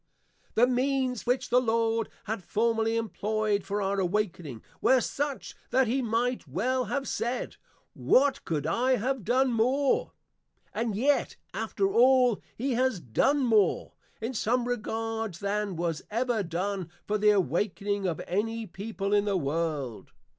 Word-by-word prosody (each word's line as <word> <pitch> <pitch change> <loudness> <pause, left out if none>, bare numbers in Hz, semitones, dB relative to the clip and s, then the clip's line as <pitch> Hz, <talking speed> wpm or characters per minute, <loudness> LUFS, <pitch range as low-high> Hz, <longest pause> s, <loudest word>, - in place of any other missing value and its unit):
The 235 - +6
means 255 -1 0
which 250 0 0
the 250 +1 +5
Lord 225 -1 +1
had 220 -3 -4
formerly 225 +1 +1
employ'd 215 -2 -1
for 200 +1 -2
our 195 +1 0
awakening, 180 - -2 0.2
were 260 - +5
such, 280 +3 -3 0.2
that 260 0 +3
he 255 +4 0
might 235 -3 -1
well 250 - 0
have 270 +5 -2
said, 240 +2 -3 0.4
What 275 0 +3
could 150 -3 -2
I 250 +10 +2
have 255 +1 -2
done 250 +4 +2
more? 260 +5 +1 0.6
and 220 -1 -1
yet 275 +7 +1 0.2
after 390 - -1
all, 250 -3 +5 0.2
he 265 +3 -1
has 255 -4 +1
done 215 - +1
more, 215 -6 +2 0.3
in 225 +4 -3
some 240 +2 0
regards, 225 -4 -3
than 205 -1 -2
was 165 -2 -2
ever 235 0 0
done 185 +1 -3 0.2
for 210 0 -1
the 210 +1 +5
awakening 200 +2 0
of 165 -4 -2
any 225 +5 -1
People 200 +1 -4
in 205 0 +3
the 200 -2 +1
World. 150 -5 -3
225 Hz, 145 wpm, -28 LUFS, 195-250 Hz, 0.6 s, The